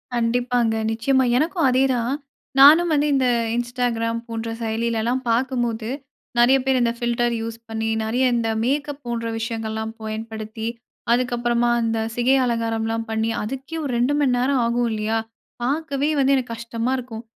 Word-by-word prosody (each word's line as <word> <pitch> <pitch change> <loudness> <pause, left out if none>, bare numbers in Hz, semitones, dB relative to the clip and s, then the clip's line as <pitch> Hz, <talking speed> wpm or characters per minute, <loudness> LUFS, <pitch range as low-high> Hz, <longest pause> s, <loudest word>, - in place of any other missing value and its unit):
கண்டிப்பாங்க. 240 0 +1 0.2
நிச்சயமா 260 +4 +2
எனக்கும் 325 0 +1
அதேதான். 255 -1 +2 0.5
நானும் 320 +5 +8
வந்து 295 0 +2
இந்த 260 -2 +2 0.3
இன்ஸ்டாகிராம் 240 -1 -1
போன்ற 230 0 -4
செயலிலலாம் 230 +2 -1
பார்க்கும்போது, 235 -2 0 0.5
நிறைய 250 +3 +6
பேர் 265 -1 +3
இந்த 235 -1 +2
ஃபில்டர் 240 0 0
யூஸ் 225 0 -5
பண்ணி 225 0 -2
நிறைய 240 +4 0
இந்த 230 -1 0
மேக்கப் 290 +3 -1
போன்ற 235 -1 -3
விஷயங்கள்லாம் 220 -1 -3
பயன்படுத்தி, 220 0 -5 0.4
அதுக்கப்பறமா 240 -1 +1
இந்த 225 0 0 0.2
சிகை 250 +3 +3
அலங்காரம்லாம் 225 -1 -1
பண்ணி, 220 0 0
அதுக்கே 270 +8 -5
ஒரு 275 - -2
2 250 +4 +2
மணி 270 -4 +2
நேரம் 255 0 +2
ஆகும் 235 0 +1
இல்லயா! 215 +1 -1 0.5
பார்க்கவே 285 +2 0
வந்து 275 0 +4
எனக்கு 250 -3 -2
கஷ்டமா 230 +1 -3
இருக்கும். 235 -2 -7
240 Hz, 140 wpm, -22 LUFS, 225-260 Hz, 0.5 s, நானும்